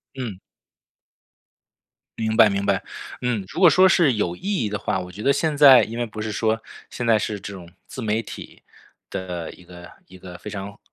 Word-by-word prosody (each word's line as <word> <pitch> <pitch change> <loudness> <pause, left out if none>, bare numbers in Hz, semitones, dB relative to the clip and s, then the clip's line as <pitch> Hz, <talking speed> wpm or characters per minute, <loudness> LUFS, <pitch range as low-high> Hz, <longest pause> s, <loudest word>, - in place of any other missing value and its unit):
嗯。 115 -8 -6 1.8
明 110 -1 -1
白 110 - +7
明 100 0 -2
白， 100 -1 +1 0.4
嗯。 120 -6 -1
如 - - -7
果 175 - +9
说 185 +5 +6
是 170 -7 +4
有 90 -6 -1
意 - - -18
义 190 - -1
的 105 0 -3
话， - - -1
我 90 0 -8
觉 100 - -9
得 140 +5 +3
现 155 0 0
在 140 -3 +8
因 115 +2 -5
为 120 - 0
不 110 -1 -10
是 110 0 -3
说， 110 +1 0 0.3
现 120 - -5
在 115 -1 +4
是 105 -1 -3
这 100 +1 -8
种 90 -3 -11 0.2
自 130 - -8
媒 110 0 -1
体 - - -11 0.5
的 90 -3 -5
一 90 - -17
个 90 0 -13 0.2
一 95 - -14
个 90 -1 -11
非 105 - -8
常 100 0 -7
105 Hz, 220 characters per minute, -23 LUFS, 95-125 Hz, 1.8 s, 果